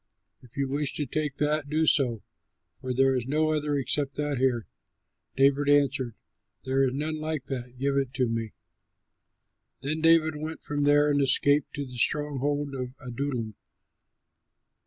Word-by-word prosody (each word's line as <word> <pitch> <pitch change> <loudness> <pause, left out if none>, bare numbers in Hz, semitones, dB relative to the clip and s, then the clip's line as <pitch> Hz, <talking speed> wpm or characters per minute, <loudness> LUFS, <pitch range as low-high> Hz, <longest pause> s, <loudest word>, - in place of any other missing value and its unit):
If 125 0 -19
you 140 -1 0
wish 140 +1 -1
to 150 - -2
take 150 +1 -3
that, 150 -1 0
do 155 +2 +1
so, 125 -8 +2 0.6
for 130 -1 -4
there 135 +1 +3
is 125 -1 -2
no 155 +2 +1
other 150 -1 0
except 140 +1 -1
that 145 -3 -1
here." 125 -4 +1 0.7
David 140 +1 +3
answered, 140 -5 +2 0.5
"There 135 +1 +1
is 130 - -3
none 155 +2 -2
like 155 -3 -3
that; 125 -2 -5
give 140 +2 0
it 135 -3 0
to 130 -2 +1
me." 115 -1 -3 1.3
Then 150 +4 -2
David 165 -1 +4
went 155 +2 -6
from 145 -1 0
there 145 0 +4
and 145 0 +2
escaped 145 +1 +3
to 145 -1 -3
the 125 -1 -10
stronghold 145 0 0
of 125 -1 -5
Adullam. 125 -3 -3
140 Hz, 155 wpm, -27 LUFS, 130-150 Hz, 1.3 s, David